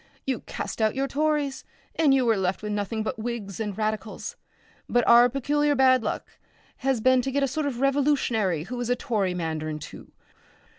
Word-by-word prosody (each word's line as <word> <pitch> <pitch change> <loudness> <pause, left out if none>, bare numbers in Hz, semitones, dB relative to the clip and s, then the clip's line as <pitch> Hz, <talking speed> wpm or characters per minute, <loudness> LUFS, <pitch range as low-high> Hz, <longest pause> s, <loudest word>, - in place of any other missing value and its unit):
You 260 -3 -1
cast - - -6
out 215 -1 +2
your 270 +1 0
Tories, 295 0 0 0.3
and 315 -4 +3
you 265 -2 +3
were 225 -1 +3
left 190 +1 -1
with 210 - -3
nothing 210 +2 -2
but 220 - -4
Whigs 220 -4 -5
and 210 -3 -3
Radicals. 215 -1 -3 0.5
But 240 -1 +2
our 240 +1 +7
peculiar 290 +3 +1
bad 260 -1 +5
luck 215 - -5 0.4
has 265 -2 0
been 255 +1 +4
to 265 - -3
get 280 +1 +1
a - - +3
sort 285 +3 -2
of 250 -4 -3
revolutionary 270 - +1
who 245 +7 -6
is 240 - -3
a 245 - +3
Tory 205 -7 -1
mandarin 155 -2 -3
too. - - -11
240 Hz, 190 wpm, -26 LUFS, 210-270 Hz, 0.5 s, our